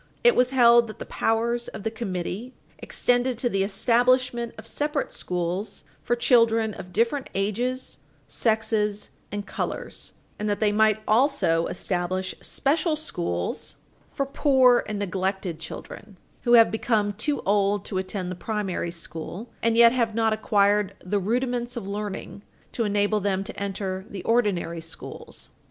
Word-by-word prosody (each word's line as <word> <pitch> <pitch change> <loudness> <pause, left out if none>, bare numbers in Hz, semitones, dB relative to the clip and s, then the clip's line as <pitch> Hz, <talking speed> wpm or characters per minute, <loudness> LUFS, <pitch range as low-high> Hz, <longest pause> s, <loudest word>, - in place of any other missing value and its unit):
It 480 -1 +6
was 250 0 +4
held 235 -2 +6
that 215 - -9
the - - -7
powers 235 +2 0
of 205 - -8
the 220 - -1
committee 220 +2 -4 0.2
extended 245 0 0
to 245 +1 0
the 195 -3 0
establishment 240 +4 +2
of 220 - -10
separate 295 +3 -2
schools 180 +3 -3 0.2
for 240 - 0
children 230 -3 +3
of 185 -2 -9
different 235 +7 0
ages, 235 +6 -2 0.3
sexes 220 -2 0 0.2
and 205 0 -4
colors, - - -5 0.3
and 210 0 -1
that 205 - 0
they 215 -1 +3
might 215 0 +3
also 220 - +3
establish 185 +1 -2
special 310 +3 0
schools 170 - -3 0.4
for 275 - -1
poor 265 -3 +4
and 210 - -3
neglected 190 -3 -2
children, 190 +4 -9 0.3
who 240 - +4
have 230 -1 +7
become 215 -2 +1
too 285 +9 -1
old 200 0 +1
to 190 - -2
attend 185 -1 -4
the - - -4
primary 195 -3 -2
school 170 +6 -7
and 230 0 +2
yet 235 0 +8
have 235 -3 0
not 225 -1 +2
acquired 205 -2 +2
the 200 +3 0
rudiments 240 +3 -1
of 230 - -4
learning 205 0 -5 0.3
to 230 - -1
enable 205 +1 +2
them 195 -1 0
to 220 - -8
enter 190 -1 -3
the 195 -3 -7
ordinary 200 -8 +1
schools. 165 0 -9
215 Hz, 150 wpm, -25 LUFS, 195-240 Hz, 0.4 s, yet